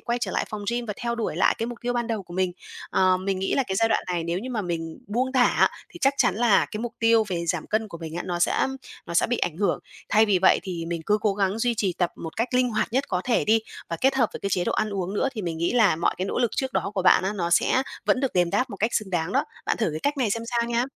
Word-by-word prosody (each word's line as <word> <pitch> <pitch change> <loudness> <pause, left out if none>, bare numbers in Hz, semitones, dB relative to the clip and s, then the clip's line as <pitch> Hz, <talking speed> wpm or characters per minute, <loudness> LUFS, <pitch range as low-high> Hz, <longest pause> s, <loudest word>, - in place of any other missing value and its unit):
quay 240 0 -2
trở - - -1
lại - - 0
phòng 210 -2 -6
gym 240 0 -2
và 210 - -2
theo 235 -1 -2
đuổi 230 -2 -3
lại - - +4
cái 230 - -1
mục 240 -1 -7
tiêu 245 0 0
ban 240 -1 -1
đầu 220 -4 -2
của 175 -1 -12
mình. 185 -1 0 0.4
Ờ, 185 -1 +3
mình 190 +1 -2
nghĩ 190 - 0
là 270 - +3
cái 190 - -2
giai 225 +3 +3
đoạn 225 - +1
này 175 -2 -2
nếu 170 +1 -1
như 250 +6 -6
mà 220 -4 -2
mình 165 -2 -4
buông 250 +5 -1
thả 250 -2 +5
á, - - +3 0.2
thì 345 - -12
chắc 275 +1 +3
chắn - - +3
là 230 -4 +4
cái 215 - -4
mục 240 -1 -4
tiêu 230 -1 +4
về 170 -2 -2
giảm - - -1
cân 215 0 -1
của 170 -4 -9
mình 160 -1 -7
á, 175 - -2
nó 175 -1 -2
sẽ 175 - +2 0.4
nó 170 - -6
sẽ - - +4
bị 245 +1 0
ảnh 165 -2 -1
hưởng. 200 +1 +1 0.3
Thay 215 +1 +4
vì 200 -3 +3
vậy - - +6
thì 175 -4 -4
mình 170 -1 -3
cứ 210 0 +3
cố 210 -2 +1
gắng 195 +1 0
duy 240 0 +1
trì 195 -4 0
tập 175 -2 +1
một 165 +4 -8
cách 230 +2 0
linh 250 -1 +3
hoạt 215 +1 -1
nhất 265 +2 +1
có 180 -2 0
thể 245 - +2
đi, 220 +1 +4 0.3
và 165 - -3
kết 270 +1 +3
hợp 245 -5 +3
với - - -7
cái 200 - -2
chế 180 -2 +1
độ - - 0
ăn 215 - 0
uống 195 -1 -3
nữa - - +1
thì 215 -4 -5
mình 165 -2 -3
nghĩ 170 +6 0
là 215 -9 +4
mọi 170 - +1
cái 185 - -1
nỗ - - -2
lực 240 -3 +2
trước 265 -1 -1
đó 200 - -1
của 190 - 0
bạn 185 - +5
á, 195 - 0
nó 170 -3 -2
sẽ 255 +8 +3 0.2
vẫn 255 - +2
được 270 - 0
đền 175 -1 +2
đáp 240 +6 0
một 200 - -6
cách 220 +4 0
xứng 210 -4 -1
đáng 175 +1 -1
đó. - - +2 0.2
Bạn - - +1
thử 220 - 0
cái 155 - -4
cách 290 +1 0
này 245 -7 +1
xem 230 +2 -1
sao 235 -1 0
nha. 240 +1 +1
210 Hz, 320 wpm, -25 LUFS, 180-235 Hz, 0.4 s, vậy